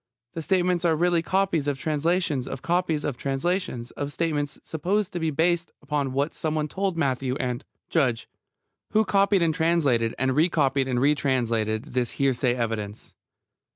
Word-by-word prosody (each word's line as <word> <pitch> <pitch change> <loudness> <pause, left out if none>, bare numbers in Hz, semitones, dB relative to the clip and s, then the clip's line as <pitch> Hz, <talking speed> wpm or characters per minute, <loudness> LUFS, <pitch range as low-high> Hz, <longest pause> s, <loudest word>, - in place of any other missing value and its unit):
The 165 - -4
statements 180 0 +1
are 165 -2 +3
really 175 +1 +2
copies 180 -4 0
of 145 -2 0
translations 155 -2 0
of 135 - -6
copies 170 -3 0
of 140 -4 -2
translations 135 -2 -2
of 145 0 -4
statements 145 -1 -2
supposed 185 +6 -1
to 175 - -2
be 160 -1 0
based 170 +3 +1
upon 145 -3 -2
what 140 +4 -1
someone 155 -1 -1
told 190 +2 -2
Matthew, 130 -3 0
and 125 0 -3 0.3
JUDGE: 130 -8 +1 0.7
Who 220 0 +4
copied 195 -2 +3
and 165 -1 +2
translated, 150 -9 +2
and 130 0 +1
re 160 +4 +4
copied 135 -4 +1
and 125 -2 0
re 140 +4 +4
translated, 115 -6 0
this 125 -2 -2
hearsay 130 -2 +1
evidence? 110 -3 -4
150 Hz, 160 wpm, -25 LUFS, 130-170 Hz, 0.7 s, Who